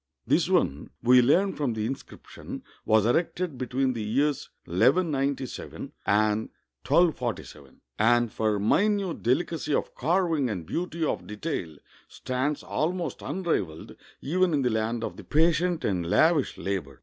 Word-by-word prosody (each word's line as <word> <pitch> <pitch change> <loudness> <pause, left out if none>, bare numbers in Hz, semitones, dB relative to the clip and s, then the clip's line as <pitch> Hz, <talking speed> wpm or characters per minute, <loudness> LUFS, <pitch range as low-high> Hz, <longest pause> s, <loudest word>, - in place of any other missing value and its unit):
This - - +2
one, 70 +2 +1
we 125 +1 +7
learn 180 +10 +3
from 140 -6 -1
the 110 -1 -2
inscription, 135 +4 -8 0.2
was 110 -1 +4
erected 160 +3 0
between 130 +1 0
the 115 - -4
years 135 +7 0 0.2
1197 135 - 0 0.2
and 105 +1 +2 0.4
1247, 115 - 0 0.2
and 120 +1 +3
for 110 -1 0
mi 110 - +3
nute 200 -5 -2
delicacy 150 +4 0
of - - -2
carving 160 -2 +1
and 90 -6 -4
beauty 170 - -3
of 90 - -2
detail 105 - -4 0.3
stands 130 +3 -3
almost 175 +3 -2
unrivaled 105 - -3 0.3
even 175 +2 +1
in 140 - +1
the 125 - +1
land 110 +1 -1
of - - -5
the - - -9
patient 165 +2 +2
and 90 -4 -1
lavish 155 - +3
labor. 90 -9 -4
130 Hz, 135 wpm, -27 LUFS, 110-165 Hz, 0.4 s, we